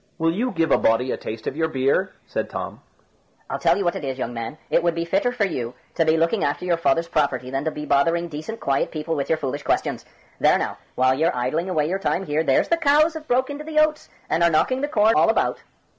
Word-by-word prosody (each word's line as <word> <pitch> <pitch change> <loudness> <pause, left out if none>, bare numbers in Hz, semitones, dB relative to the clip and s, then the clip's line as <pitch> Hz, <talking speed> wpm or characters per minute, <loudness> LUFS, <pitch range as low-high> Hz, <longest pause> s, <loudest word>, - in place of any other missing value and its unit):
"Will 165 -1 +2
you 240 +8 -1
give 165 - 0
a - - +5
body 120 +3 +2
a - - 0
taste 110 0 -7
of - - -3
your 160 +1 +1
beer?" 140 +6 +1
said - - -3
Tom. - - -6 0.7
"I'll - - -2
tell - - +3
you 200 - -1
what 175 - +1
it - - -5
is, 135 -1 -3
young 120 -2 -3
man, 115 +5 -5
it - - +4
would 170 -1 +1
be 170 0 -2
fitter 195 +8 +1
for 240 -5 0
you 125 -10 -4 0.2
to 165 - +2
be 160 0 +3
looking 170 +6 +1
after 145 +5 -1
your 175 -2 +1
father's 165 0 +1
property 130 -6 0
than 135 +2 -2
to - - +2
be 150 -1 -6
bothering 165 +5 +2
decent 160 +8 -7
quiet 135 0 0
people 155 +1 -4
with 140 -2 -3
your 160 - +2
foolish 145 -1 -3
questions. - - -1 0.4
There - - +4
now, - - -3 0.2
while 130 0 +3
you're 160 +4 +1
idling 155 +9 -1
away 155 -5 +1
your 190 +4 -1
time 195 -1 -1
here, 150 -1 0
there's 135 -4 +2
the 335 - +3
cows 310 +1 +4
have 315 -1 -8
broke 260 +3 +1
into 290 +1 -6
the 310 0 -6
oats, 310 0 +2 0.2
and 165 - 0
are 170 - +5
knocking 255 +11 +1
the 290 - 0
corn 220 -5 +3
all - - +4
about." 225 - +1
165 Hz, 255 wpm, -23 LUFS, 140-200 Hz, 0.7 s, a